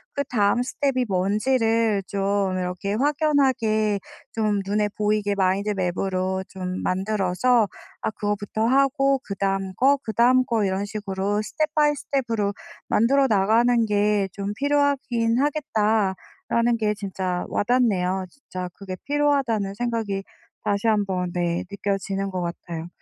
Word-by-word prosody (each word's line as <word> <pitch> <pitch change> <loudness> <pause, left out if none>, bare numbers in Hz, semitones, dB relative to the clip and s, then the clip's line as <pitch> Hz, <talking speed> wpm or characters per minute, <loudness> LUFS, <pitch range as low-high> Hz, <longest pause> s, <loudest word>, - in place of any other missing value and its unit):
그다음 240 -5 +1
스텝이 255 -1 0
뭔지를 220 +2 +2
좀 195 -1 0
이렇게 180 +2 -3
확연하게 260 -7 +2 0.3
좀 210 -3 0
눈에 210 +1 +1
보이게 210 -1 +1
마인드 195 +2 +1
맵으로 185 0 -1
좀 185 -1 -5
만들어서 200 +4 +1 0.3
아 - - 0
그거부터 205 +1 -2
하고 275 +2 +3
'그다음 195 -1 -2
거, 275 +6 +4
그다음 245 +3 +3
거 225 -3 0
이런 195 +1 0
식으로 205 -1 -2
스텝 305 +7 -2
바이 295 -1 +4
스텝으로 230 -8 -1 0.3
만들어 270 +5 +3
나가는 225 +3 +3
게 205 -1 +2
좀 200 0 -4
필요하긴 275 -4 +1
하겠다.'라는 230 - 0
게 210 -1 +1
진짜 185 -3 -3
와닿네요. 195 -6 +1
진짜 185 -8 -7
그게 190 -2 -7
필요하다는 275 -9 +1
생각이 225 -4 -2 0.4
다시 205 +2 0
한번 190 -4 0
느껴지는 195 +3 -2
것 185 -1 -3
같아요. 170 -1 -5
210 Hz, 285 characters per minute, -24 LUFS, 195-245 Hz, 0.4 s, 거